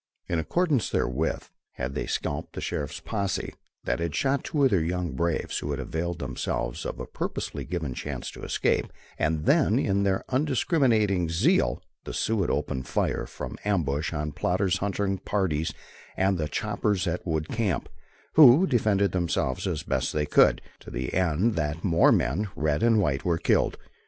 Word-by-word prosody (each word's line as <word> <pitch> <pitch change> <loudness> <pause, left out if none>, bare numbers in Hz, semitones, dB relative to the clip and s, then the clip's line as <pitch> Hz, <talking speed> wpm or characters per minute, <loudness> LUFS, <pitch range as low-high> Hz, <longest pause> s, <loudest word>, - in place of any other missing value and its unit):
In 85 - 0
accordance 150 - +1
therewith, 75 +6 -1 0.3
had 65 +2 -4
they 75 - -3
scalped 70 - -3
the - - -5
sheriff's - - -3
posse 100 -3 -2 0.3
that - - -1
had 85 -3 -2
shot 140 +1 +1
two 145 -2 0
of 135 - +5
their 95 -5 +3
young 90 +1 -1
braves 85 0 -1
who 75 - -5
had 70 -2 -2
availed 85 +6 -3
themselves 60 -3 -3
of - - -6
a - - -4
purposely - - -4
given 80 -7 -3
chance - - -5
to - - -11
escape, - - 0 0.3
and 80 0 0
then 140 -7 +4
in 100 -7 +1
their 95 -1 +1
undiscriminating 125 - +2
zeal, 85 +1 +2 0.2
the - - -5
Sioux 110 -2 +1
had 90 - 0
opened 65 -1 -2
fire - - -1
from - - -7
ambush 80 -8 0
on 75 -2 -3
Plodder's 90 +4 0
hunting 100 -1 -1
parties 80 -6 -1 0.5
and 95 -1 +2
the 75 - 0
choppers 105 +1 -1
at 90 0 -2
the - - -6
wood 80 -1 -1
camp, 110 -6 -1 0.5
who 155 +3 +8
defended 105 - +2
themselves 85 -8 -1
as - - -2
best - - -1
they 75 -1 0
could, 75 - +4 0.2
to - - -11
the 65 0 -4
end 95 +5 +2
that 80 -1 -2
more 85 -3 +5
men, 85 - +1
red 75 0 0
and 115 -2 +4
white, 70 -8 0
were 85 -2 +1
killed. - - +2
90 Hz, 175 wpm, -27 LUFS, 75-105 Hz, 0.5 s, who